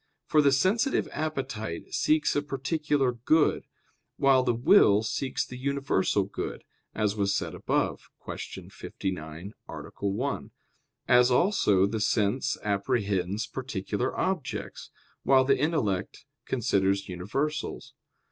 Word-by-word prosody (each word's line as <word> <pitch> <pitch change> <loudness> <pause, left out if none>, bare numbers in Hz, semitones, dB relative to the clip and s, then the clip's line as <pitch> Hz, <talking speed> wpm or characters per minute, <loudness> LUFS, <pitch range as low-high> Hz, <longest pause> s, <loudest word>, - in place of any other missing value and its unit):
For 155 - +4
the 140 -1 +4
sensitive 200 - +2
appetite 135 - -4
seeks 155 0 +2
a 145 - +2
particular 145 -1 0
good; 130 +7 +2 0.5
while 135 -1 +5
the 125 -1 +1
will 115 - +5
seeks 130 +5 -2
the 125 - -9
universal 135 -8 +1
good, 100 - -6 0.3
as 105 -1 0
was 100 -2 +1
said - - -2
above - - -1 0.2
(Q. - - -7
59, 85 +1 -6 0.2
A. - - -6 0.4
1); 125 +8 -2 0.6
as 125 0 +6
also 125 - +3
the 110 +2 -2
sense 110 +7 +1
apprehends 100 -1 0
particular 105 -6 -3
objects, 185 -7 -3 0.3
while 135 -1 +5
the 135 -1 +3
intellect 135 - -1 0.2
considers 100 -6 +1
universals. 135 - -3
125 Hz, 115 wpm, -28 LUFS, 100-140 Hz, 0.6 s, as